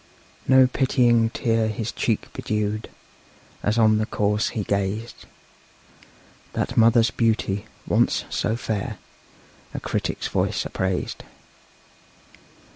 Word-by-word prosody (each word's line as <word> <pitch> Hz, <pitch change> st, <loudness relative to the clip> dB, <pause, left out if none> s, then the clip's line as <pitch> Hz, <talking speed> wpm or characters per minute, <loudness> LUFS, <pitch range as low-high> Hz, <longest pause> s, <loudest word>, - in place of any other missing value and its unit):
No 130 Hz, 0 st, +7 dB
pitying 125 Hz, -3 st, +3 dB
tear 115 Hz, -2 st, 0 dB
his 110 Hz, +1 st, -3 dB
cheek 110 Hz, -3 st, -2 dB
bedewed, 105 Hz, 0 st, -2 dB, 0.7 s
As 105 Hz, +2 st, 0 dB
on 110 Hz, -1 st, +4 dB
the 110 Hz, -, -1 dB
corse 105 Hz, +1 st, 0 dB
he 110 Hz, -, -3 dB
gazed; 100 Hz, +4 st, -3 dB, 1.3 s
That -, -, -2 dB
mother's 115 Hz, +1 st, +5 dB
beauty, 110 Hz, -3 st, 0 dB, 0.2 s
once -, -, +2 dB
so 110 Hz, -, 0 dB
fair, 110 Hz, -4 st, -3 dB, 0.8 s
A -, -, -2 dB
critic's -, -, -2 dB
voice -, -, -1 dB
appraised. 95 Hz, -1 st, -2 dB
110 Hz, 105 wpm, -24 LUFS, 105-115 Hz, 1.3 s, No